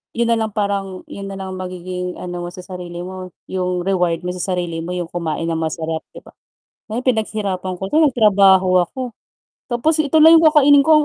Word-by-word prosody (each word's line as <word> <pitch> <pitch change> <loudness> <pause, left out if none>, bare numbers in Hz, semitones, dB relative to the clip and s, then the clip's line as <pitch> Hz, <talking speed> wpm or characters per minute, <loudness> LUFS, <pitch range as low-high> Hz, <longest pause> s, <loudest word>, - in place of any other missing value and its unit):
'yon 235 0 +1
na 230 - +3
lang, 220 -1 -2
parang 200 -2 -2
'yon 200 - -7
na 195 - -6
lang 190 -1 -6
ang - - -8
magiging 180 0 -5
ano 175 -1 -5
mo - - -5
sa 180 - -9
sarili 175 -2 -7
mo, 185 -1 -8 0.2
'yong 180 -1 -1
reward 180 -3 0
mo 180 - -3
sa 185 +1 -3
sarili 175 -2 -3
mo 175 +2 -5
'yong 175 -2 -4
kumain 165 -1 -3
ng 165 - -1
masarap, 160 0 -3
'di - - -11
ba? - - -16 0.6
Na 220 - -3
'yong, 255 - -9
"Pinaghirapan 205 -6 -1
ko 190 - -8
'to, 310 - +3
nagtrabaho 195 -8 +4
ako. 260 - -11 0.7
Tapos 300 +7 +2
ito 295 +2 +1
lang 320 +2 +8
'yong 325 - +5
kakainin 285 -1 +6
ko, 310 0 +5
185 Hz, 210 wpm, -19 LUFS, 180-220 Hz, 0.7 s, lang